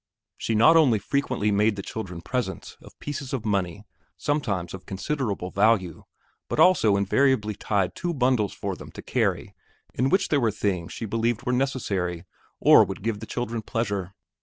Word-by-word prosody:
She 115 - -2
not 120 +10 +6
only 140 -9 +5
frequently 125 -1 -1
made 105 +1 +2
the 100 - -6
children 95 -7 -6
presents 105 - -4
of - - -16
pieces 140 -2 -6
of 125 -5 -3
money, 95 -5 -1 0.3
sometimes 105 - -2
of 95 - -9
considerable 100 -3 -3
value, 100 -4 +1 0.4
but - - -2
also 110 - +5
invariably 110 +2 +2
tied 100 -2 -1
two 175 -1 -3
bundles 125 - +1
for 100 -2 -4
them - - -11
to - - -9
carry - - -1 0.4
in 130 +2 +1
which 190 +5 +2
there 145 - +3
were 115 - +3
things 95 -5 -2
she 115 - -5
believed 115 +2 -1
were 125 - 0
necessary 100 -10 -1 0.3
or - - +7
would - - -6
give 110 -2 -1
the 110 - -8
children 120 -2 -3
pleasure. 100 -4 -3
110 Hz, 170 wpm, -25 LUFS, 100-130 Hz, 0.4 s, or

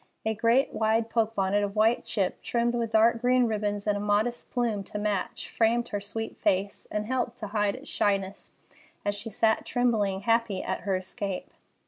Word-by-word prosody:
A 220 - +1
great, 230 +5 +2
wide 225 +1 +1
poke 225 -1 +1
bonnet 195 +1 +1
of 200 0 -3
white 220 +3 +3
chip, 195 -4 -1
trimmed 235 0 0
with 235 -1 -1
dark 230 +1 +4
green 250 0 +4
ribbons 205 -2 -1
and 210 -1 +2
a - - -2
modest 210 +4 0
plume 230 -5 -1
to 210 - -6
match, 205 -2 -2
framed 235 +1 +1
her 205 - -3
sweet 225 +2 -5
face, 195 +1 0
and 210 0 -2
helped 245 0 -1
to 220 -4 -5
hide 205 -1 +1
its - - -11
shyness 195 -1 -1 0.6
as 205 - +1
she 205 +3 -6
sat 220 +1 +2
tremblingly 215 -6 +1
happy 230 -3 +1
at - - -3
her 195 -2 +1
escape. 190 +1 -4
220 Hz, 185 wpm, -28 LUFS, 205-230 Hz, 0.6 s, dark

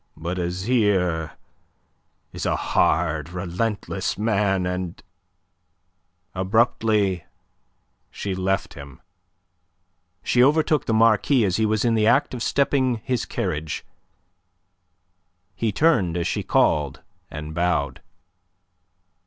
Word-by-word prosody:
But 85 +3 -4
Azyr 90 -3 0 1.0
is - - -3
a - - +1
hard, 80 -2 +1
relentless 90 +5 -3
man, 100 -3 +1
and..." 90 -1 -4 1.3
Abruptly 100 - +1 0.8
she 100 - -4
left 95 +1 -1
him. 70 -2 -11 1.2
She 125 - +3
overtook 150 +1 +3
the 115 - +1
Marquis 115 +2 +4
as 90 -3 0
he 110 -1 +2
was 110 +1 0
in 115 - +3
the 110 -1 +2
act 120 - +3
of 125 - -5
stepping 135 -1 +1
his 125 -3 -1
carriage. 80 -4 -3 1.7
He 110 +3 -1
turned 100 - +2
as 85 - -1
she - - -1
called, 70 -2 +1 0.3
and 75 +1 -7
bowed. 85 -4 -1
95 Hz, 105 wpm, -23 LUFS, 85-115 Hz, 1.7 s, Marquis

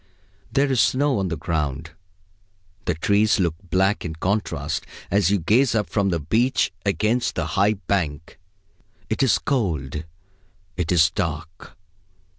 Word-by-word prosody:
There 140 0 +2
is 130 - +3
snow 135 -2 +2
on 95 - 0
the 85 -2 -3
ground. 80 -2 -2 0.9
The 90 - 0
trees 100 +6 +2
look 85 -4 +1 0.2
black 95 +4 +2
in 80 -2 -5
contrast 80 -5 -2 0.2
as 100 -2 +3
you 100 - +3
gaze 115 +9 +2
up 105 -2 -1
from 100 -2 +1
the 85 -2 0
beach 110 - +1
against 110 +5 0
the 85 - -1
high 100 +2 +3
bank. 85 -7 -3 0.7
It - - 0
is 135 -4 +4
cold. 80 - -2 0.7
It 85 -1 -2
is 85 -1 +4
dark. 85 -1 -5
95 Hz, 140 wpm, -23 LUFS, 80-105 Hz, 0.9 s, is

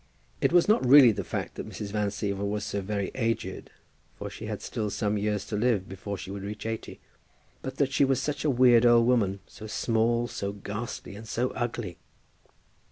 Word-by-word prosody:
It - - +3
was 175 0 +5
not 215 - +4
really 130 -1 +8
the 100 -2 -3
fact - - -4
that - - -7
Mrs. 100 -1 -6
Van 105 -1 0
Siever 100 0 -2
was 105 +1 -1
so 100 -1 -2
very 100 0 -2
aged, 115 -6 -2 0.5
for - - -6
she - - -7
had - - -4
still 105 -1 -3
some 105 0 -1
years 105 0 -1
to 105 - -4
live 105 -3 +1
before 95 +1 -6
she 95 - -7
would 100 0 -5
reach 105 +2 -6
eighty, 115 0 -5 0.6
but 130 0 -6
that 140 -2 +1
she - - +4
was 135 -2 +2
such 145 -1 -2
a 155 - +2
weird 125 -3 +6
old 120 -1 +6
woman, 100 -6 +2
so 110 - -11
small, 115 +2 +1
so 100 -3 -4
ghastly, 105 -1 -6
and 110 +2 -10
so 120 +3 -1
ugly! 120 -7 -4
110 Hz, 200 wpm, -28 LUFS, 100-120 Hz, 0.6 s, really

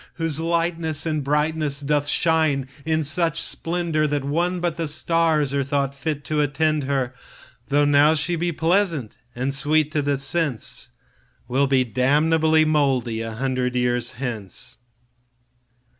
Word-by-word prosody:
Whose 165 -3 -2
lightness 165 -2 -1
and 155 -2 -1
brightness 150 0 0
doth 145 0 0
shine 155 -5 +1 0.2
in 160 0 +1
such 165 +2 +1
splendourThat 160 -4 0
one 170 +6 0
but 175 -2 -1
the 165 -1 -3
starsAre 155 -3 +1
thought 140 0 -1
fit 145 +1 -4
to 155 -1 0
attend 150 0 0
her, 130 -2 -1 0.5
Though 145 +1 +3
now 145 +2 +5
she 165 +3 0
be 170 +1 -1
pleasant 165 - 0 0.2
and 130 +3 -2
sweet 150 +2 +1
to 155 -2 0
the 140 0 0
sense, 135 -3 -2 0.6
Will 135 +3 +1
be 135 -1 +3
damnable 155 +6 +2
mouldy 135 -7 +1
a 115 0 -5
hundred 130 +1 -2
years 125 -1 0
hence. 115 -5 -5
150 Hz, 135 wpm, -22 LUFS, 135-160 Hz, 0.6 s, now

